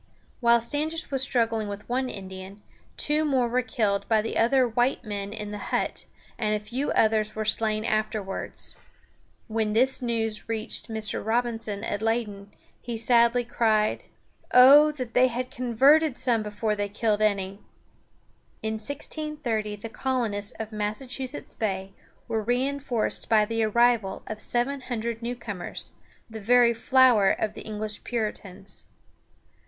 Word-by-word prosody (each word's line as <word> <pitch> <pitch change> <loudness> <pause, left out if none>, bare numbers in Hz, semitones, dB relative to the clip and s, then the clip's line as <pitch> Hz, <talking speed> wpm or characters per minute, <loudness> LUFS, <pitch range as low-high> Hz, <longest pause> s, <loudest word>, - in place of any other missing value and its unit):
While 235 -1 +5
Standish 300 +7 -1
was 270 -1 0
struggling 230 -4 +1
with 205 +1 -7
one 255 +1 -1
Indian, 190 0 -9 0.3
two 300 +1 +2
more 265 -5 +2
were 250 +2 +1
killed 215 -5 -1
by 220 -2 +3
the 225 - -4
other 250 +2 +3
white 240 +3 0
men 200 -2 -4
in 210 -1 -6
the 210 - -5
hut, - - -1 0.3
and 215 -2 +1
a - - -1
few 240 +7 -3
others 215 -1 +2
were 215 0 -2
slain 215 0 0
afterwards. 215 -3 -2 0.7
When 220 -2 -1
this 260 +5 +3
news 225 -3 -2
reached 220 0 -4
Mr. 220 -2 -3
Robinson 225 -2 -1
at 205 -2 -3
Leyden, 215 -3 -2 0.3
he 235 -1 -5
sadly 235 +1 +3
cried: 220 -2 +1 0.5
"Oh, 285 +4 +8
that 255 -5 -6
they 255 +1 +5
had 250 +1 -4
converted 270 +4 +3
some 240 -3 +1
before 210 +1 -2
they 205 0 -2
killed 210 0 0
any!" 200 -2 0 1.0
In 220 0 -2
1630 260 -4 -3
the 205 +2 -7
colonists 225 -5 -1
of 220 0 -7
Massachusetts 245 +6 -4
Bay 195 -3 -3 0.3
were 220 - -1
reinforced 250 +1 -1
by 215 -2 +5
the 225 +1 -1
arrival 230 -3 +2
of 215 0 -6
seven 265 +3 0
hundred 235 -2 -4
newcomers, 235 -6 -5 0.4
"the 220 -1 -8
very 240 +2 +5
flower 240 -4 +5
of 215 -1 -1
the - - -9
English 215 -1 -6
Puritans." 210 -5 -4
225 Hz, 140 wpm, -26 LUFS, 210-245 Hz, 1.0 s, Oh